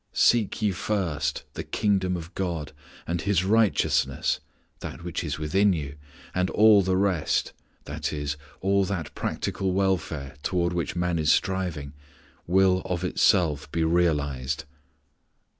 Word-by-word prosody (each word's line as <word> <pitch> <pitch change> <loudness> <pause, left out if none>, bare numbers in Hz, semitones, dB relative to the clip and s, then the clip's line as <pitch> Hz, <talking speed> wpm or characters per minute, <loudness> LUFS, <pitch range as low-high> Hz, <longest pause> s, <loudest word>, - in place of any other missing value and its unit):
"Seek 115 -2 +3
ye 105 - +3
first 85 -7 -2
the - - -5
Kingdom 95 -3 0
of 85 +1 -9
God 85 -6 -3 0.3
and 85 0 -2
His 95 -2 +1
righteousness 110 +1 +2 0.4
(that - - -7
which 85 0 -3
is 75 -2 -3
within 95 +6 +2
you), 70 -4 -4 0.4
and 90 0 +1
all 105 -1 +6
the 95 0 +1
rest 95 -5 +1 0.3
i.e. 75 -1 -4 0.3
all 100 +1 +3
that 85 -6 -4
practical 95 -1 -2
welfare 85 -8 -1
toward 85 +2 0
which 85 0 -2
man 85 -1 0
is 75 0 +3
striving 90 -7 -1 0.5
will 95 +1 +4
of 90 -1 -2
itself 80 -6 +2
be 85 - 0
realized." 75 -5 0
90 Hz, 130 wpm, -26 LUFS, 75-95 Hz, 0.5 s, all